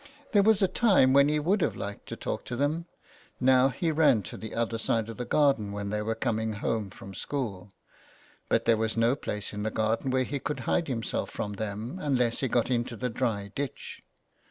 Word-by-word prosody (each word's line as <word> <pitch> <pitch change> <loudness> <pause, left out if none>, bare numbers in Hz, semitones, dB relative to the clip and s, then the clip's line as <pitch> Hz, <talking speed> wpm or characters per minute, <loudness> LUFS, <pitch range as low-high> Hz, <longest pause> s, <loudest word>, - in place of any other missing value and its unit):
There 205 -5 +5
was 210 0 +4
a - - +5
time 185 - +4
when 140 +1 +6
he 150 - +2
would 185 +7 +1
have - - +1
liked 100 0 -6
to - - -5
talk - - -4
to 120 - -4
them, 150 +6 -1 0.5
now 130 +1 +5
he 165 +5 -1
ran 150 -9 +4
to - - -8
the 110 - -7
other 115 0 -1
side 115 0 0
of 115 - -7
the 125 - -3
garden 135 -8 +2
when 100 0 -4
they 105 0 -1
were 110 +1 -1
coming 110 -2 -1
home 105 -1 -2
from 95 0 -11
school; 105 -5 -4 0.8
but - - +2
there 115 - +4
was 110 +1 -1
no 115 +3 +3
place 105 -8 -5
in 105 - -4
the 110 - 0
garden 110 +5 0
where 130 0 +2
he 140 +3 -3
could 145 -1 -3
hide 165 +7 0
himself 115 -6 -2
from 105 -1 -4
them, 110 - -5
unless 125 -5 +1
he 135 - +1
got 120 +1 +1
into 120 -1 0
the 125 +1 -3
dry 105 -5 -2
ditch. 140 -2 -5
120 Hz, 215 wpm, -28 LUFS, 110-140 Hz, 0.8 s, when